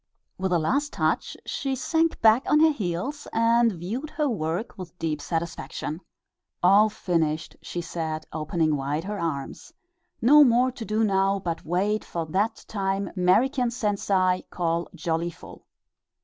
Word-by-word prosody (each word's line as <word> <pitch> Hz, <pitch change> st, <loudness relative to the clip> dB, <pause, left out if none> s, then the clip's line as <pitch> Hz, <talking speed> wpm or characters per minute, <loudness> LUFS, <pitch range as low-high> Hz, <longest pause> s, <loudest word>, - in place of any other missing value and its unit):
With 190 Hz, 0 st, -1 dB
a 175 Hz, -, +4 dB
last 280 Hz, -, 0 dB
touch -, -, -1 dB
she 270 Hz, -1 st, -2 dB
sank 325 Hz, +5 st, 0 dB
back 220 Hz, +3 st, +6 dB
on 300 Hz, -, +5 dB
her 320 Hz, 0 st, +6 dB
heels 210 Hz, -, -3 dB
and 230 Hz, +1 st, +3 dB
viewed 210 Hz, -, -5 dB
her 300 Hz, -1 st, -1 dB
work 185 Hz, -, -2 dB
with 180 Hz, -2 st, -10 dB
deep 155 Hz, -3 st, -2 dB
satisfaction. 160 Hz, 0 st, -4 dB, 0.6 s
"All 200 Hz, +4 st, +6 dB
finished," 165 Hz, -7 st, -1 dB
she 175 Hz, -, -5 dB
said, 160 Hz, -2 st, -4 dB
opening 155 Hz, 0 st, 0 dB
wide 145 Hz, +3 st, -2 dB
her 205 Hz, +2 st, -4 dB
arms; 160 Hz, -, -4 dB, 0.5 s
"no 290 Hz, +5 st, +7 dB
more 250 Hz, 0 st, +4 dB
to 240 Hz, -3 st, -8 dB
do 215 Hz, +1 st, 0 dB
now 195 Hz, -1 st, +2 dB
but 170 Hz, -3 st, -4 dB
wait 195 Hz, +6 st, 0 dB
for 170 Hz, -1 st, -4 dB
that 195 Hz, +8 st, -1 dB
time 195 Hz, -1 st, -2 dB
'Merican 235 Hz, +8 st, +3 dB
sensei 200 Hz, -5 st, +1 dB
call 170 Hz, -1 st, -1 dB
jollyful!" 170 Hz, 0 st, -4 dB
190 Hz, 145 wpm, -25 LUFS, 165-230 Hz, 0.6 s, no